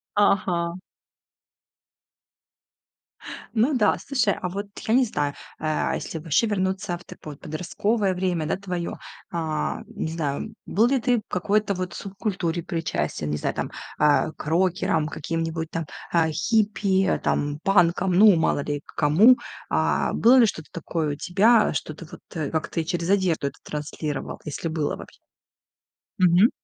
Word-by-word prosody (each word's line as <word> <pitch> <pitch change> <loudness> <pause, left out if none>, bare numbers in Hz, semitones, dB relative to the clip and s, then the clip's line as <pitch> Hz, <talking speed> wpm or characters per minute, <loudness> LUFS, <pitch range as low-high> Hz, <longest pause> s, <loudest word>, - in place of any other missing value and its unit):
Ага. 180 -4 +2 2.8
Ну 255 +7 +3
да, 230 -5 +3
слушай, 250 -8 +2
а 180 - -2
вот 200 +3 -4 0.2
я 220 - +1
не 260 +1 +5
знаю, 145 -10 -1 0.3
а, 155 0 0
если 165 - -5
ваще 160 +7 +2
вернуться 190 -3 -1
в 175 - -18
такое 150 - -9
вот - - -25
подростковое 195 +5 -1
время, 180 -3 -1
да, - - -1
твоё. 180 -3 -4 0.4
А, 160 -3 -2
не 210 -8 -4
знаю, 160 +5 -3
был 225 +4 +3
ли 270 0 +2
ты 245 0 +2
в - - -10
какой-то 200 +3 +1
вот 180 -1 -4
субкультуре 190 -4 -3
причастен, 165 - -2
не 75 - -1
знаю, - - -2
там, - - -3 0.3
а, 150 +1 +3
к - - -10
рокерам 165 -2 +1
каким-нибудь 165 +1 -3
там, 165 -1 -3 0.3
а, 165 -2 +3
хиппи, 200 +1 +1
а, - - +2
там, 145 0 -1
панкам, 185 -1 +3
ну, 200 +2 +7
мало 160 -3 +1
ли 145 0 -3
к - - -16
кому? 185 +12 +6 0.3
А, - - +1
было 240 +3 +5
ли 235 - +7
что-то 160 -6 -5
такое 160 -2 -2
у - - -4
тебя, 210 +8 +3
что 155 +1 -3
ты 170 - -11
вот, - - -10 0.2
э, 155 -4 -2
как-то 160 +1 -1
и - - -6
через 175 0 -2
одежду 185 -7 +2
это - - -8
транслировал? 150 0 -5
Если 150 +3 -4
было 160 -2 -2
вообще. - - -12 1.0
Мгм. 180 +4 +6
175 Hz, 160 wpm, -24 LUFS, 160-200 Hz, 2.8 s, ну